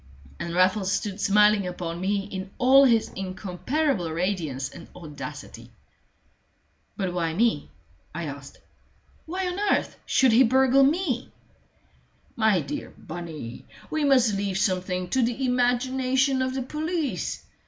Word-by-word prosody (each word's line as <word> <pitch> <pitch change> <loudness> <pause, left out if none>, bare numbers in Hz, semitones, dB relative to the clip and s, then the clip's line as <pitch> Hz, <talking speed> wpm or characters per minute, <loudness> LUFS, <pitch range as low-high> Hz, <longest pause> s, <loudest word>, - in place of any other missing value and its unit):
And 170 0 -4
Raffles 190 +1 +2
stood 205 0 -2
smiling 210 -1 +4
upon 175 -1 -5
me 200 +1 0
in 190 0 -6
all 270 +2 +6
his 230 -4 +3
incomparable 190 - -2
radiance 160 -6 -2
and 170 - -12
audacity. 155 -5 -9 1.3
"But 190 -4 -2
why 165 -2 -1
me?" 220 - +1 0.5
I 170 - -3
asked. 140 -1 -8 0.7
"Why 370 +3 -3
on 360 +1 -3
earth 410 0 0
should 265 -2 +4
he 230 +3 +6
burgle 265 +2 +4
me?" 280 -3 +1 1.0
"My 220 -6 +3
dear 140 - -5
Bunny, 160 -7 -8 0.3
we 310 -1 0
must 255 -6 +4
leave 195 -1 -1
something 185 -2 -1
to 260 - +1
the 245 +3 0
imagination 255 +2 +1
of 260 0 -1
the 265 - -2
police. 310 +2 -3
210 Hz, 130 wpm, -25 LUFS, 180-260 Hz, 1.3 s, all